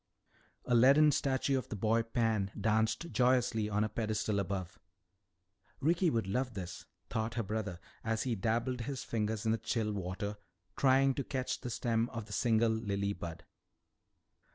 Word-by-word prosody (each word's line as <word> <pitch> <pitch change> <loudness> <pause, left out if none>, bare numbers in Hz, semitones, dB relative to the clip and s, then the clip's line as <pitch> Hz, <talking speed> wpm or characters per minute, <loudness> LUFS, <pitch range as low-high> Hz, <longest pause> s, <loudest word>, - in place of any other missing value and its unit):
A 125 - 0
leaden 140 +6 +7
statue 135 -1 +1
of 130 - -9
the - - -4
boy 110 +3 +2
Pan 115 -3 0
danced 110 - +1
joyously 120 -2 +2
on 105 0 +1
a - - +1
pedestal 110 -1 -1
above. 95 -2 -3 1.0
Ricky 170 +5 +3
would 115 -8 0
love 125 +4 -1
this, 90 -2 -6 0.2
thought 110 +1 -2
her 115 - 0
brother 105 -4 -3 0.2
as 110 0 0
he 125 - 0
dabbled 115 +4 -1
his 135 +1 -4
fingers 110 0 -2
in 110 - +3
the 115 - +1
chill 105 -1 -1
water 100 +2 -4 0.4
trying 135 0 +4
to 140 - -2
catch 130 -1 -3
the 125 - -4
stem 115 0 0
of 115 -2 -6
the 105 - -9
single 115 0 +3
lily 100 -2 -1
bud. 85 -3 -7
110 Hz, 160 wpm, -33 LUFS, 105-125 Hz, 1.0 s, leaden